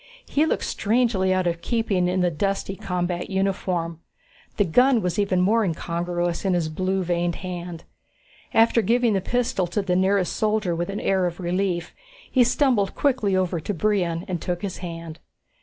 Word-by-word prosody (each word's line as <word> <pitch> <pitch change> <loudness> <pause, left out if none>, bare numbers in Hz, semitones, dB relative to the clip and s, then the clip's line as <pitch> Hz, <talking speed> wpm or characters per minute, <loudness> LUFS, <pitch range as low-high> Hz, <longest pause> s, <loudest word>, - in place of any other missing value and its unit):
He 305 +2 +1
looked - - 0
strangely 215 -4 +1
out 185 -1 +1
of 170 -1 -1
keeping 200 -3 0
in 180 +1 0
the 175 -1 +2
dusty 195 +3 -2
combat 180 -2 -3
uniform. 185 -4 -1 0.6
The 205 - +4
gun 245 +6 +4
was 180 +1 -1
even 195 -3 +2
more 220 +5 +3
incongruous 175 0 -2
in 190 -2 +1
his 165 -3 0
blue 185 +4 -1
veined 175 0 0
hand. 175 -2 -6 0.7
After 230 +1 +4
giving 235 0 +2
the 195 - +1
pistol 235 -4 0
to 185 +4 -2
the 180 -2 0
nearest 190 0 +2
soldier 210 -5 0
with 175 +3 -3
an 200 - -3
air 190 -2 +2
of 175 +1 -6
relief, 180 -1 -1 0.4
he 255 - +5
stumbled 240 -5 +2
quickly 250 -9 +1
over 185 -2 0
to 200 +6 -4
Brion 175 -2 0
and 180 -4 -3
took 175 0 -3
his 195 -3 -3
hand. 165 -2 -7
185 Hz, 175 wpm, -24 LUFS, 175-205 Hz, 0.7 s, he